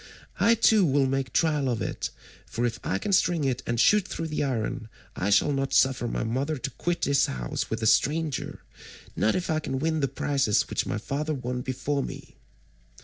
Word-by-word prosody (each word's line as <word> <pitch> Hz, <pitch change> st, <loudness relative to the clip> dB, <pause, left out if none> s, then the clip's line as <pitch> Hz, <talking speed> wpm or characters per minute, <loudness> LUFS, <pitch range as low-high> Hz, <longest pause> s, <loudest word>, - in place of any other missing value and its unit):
I 230 Hz, -, +5 dB
too 220 Hz, -2 st, +4 dB
will 140 Hz, -4 st, +3 dB
make 135 Hz, -2 st, -1 dB
trial 150 Hz, -4 st, +1 dB
of 120 Hz, -3 st, -1 dB
it, -, -, -3 dB, 0.4 s
for 120 Hz, -, -2 dB
if 115 Hz, -1 st, -2 dB
I 95 Hz, -, -1 dB
can 200 Hz, -, -2 dB
string 175 Hz, -4 st, +3 dB
it 130 Hz, -2 st, 0 dB
and 120 Hz, 0 st, -1 dB
shoot 210 Hz, -, +4 dB
through 165 Hz, 0 st, -4 dB
the 150 Hz, -, -1 dB
iron, 115 Hz, -4 st, -2 dB, 0.3 s
I 95 Hz, -, -1 dB
shall 105 Hz, +8 st, +4 dB
not 135 Hz, -1 st, -1 dB
suffer 130 Hz, -2 st, +3 dB
my -, -, -2 dB
mother 135 Hz, +7 st, -1 dB
to 135 Hz, +2 st, -4 dB
quit 175 Hz, +6 st, -3 dB
this 140 Hz, -1 st, +3 dB
house -, -, -4 dB
with 110 Hz, 0 st, -3 dB
a -, -, +1 dB
stranger, 150 Hz, +5 st, +1 dB, 0.5 s
not 110 Hz, -, +2 dB
if 180 Hz, -2 st, -1 dB
I 155 Hz, -, +1 dB
can 135 Hz, -3 st, -3 dB
win 160 Hz, +3 st, 0 dB
the 135 Hz, -, +1 dB
prizes 135 Hz, -4 st, +1 dB
which -, -, -1 dB
my -, -, -2 dB
father 150 Hz, +2 st, -3 dB
won 125 Hz, -1 st, -4 dB
before 130 Hz, +3 st, -2 dB
me." -, -, -8 dB
135 Hz, 205 wpm, -26 LUFS, 120-155 Hz, 0.5 s, I